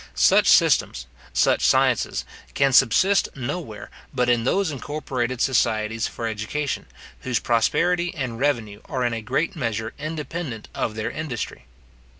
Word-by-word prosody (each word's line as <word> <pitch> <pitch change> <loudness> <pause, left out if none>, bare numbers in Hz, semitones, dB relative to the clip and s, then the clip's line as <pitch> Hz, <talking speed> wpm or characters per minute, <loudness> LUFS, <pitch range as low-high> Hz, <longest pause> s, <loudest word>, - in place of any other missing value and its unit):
Such - - +5
systems, 60 - +4 0.3
such - - +2
sciences, - - +2 0.3
can 140 -1 +3
subsist 175 - +4
nowhere 135 -4 -5 0.2
but 125 -1 0
in 120 -1 +2
those 190 +5 +1
incorporated 130 -3 -3
societies 110 -3 +1
for 115 - -5
education, 115 +6 -3 0.3
whose 125 -2 -1
prosperity 175 +11 +1
and 130 -6 -4
revenue 115 -7 -1
are 130 -3 -2
in 120 - 0
a 115 - -3
great 135 - -1
measure 115 -6 -3
independent 155 -5 -5
of 110 - -2
their 110 -1 -3
industry. 140 -8 -5
125 Hz, 135 wpm, -23 LUFS, 115-150 Hz, 0.3 s, Such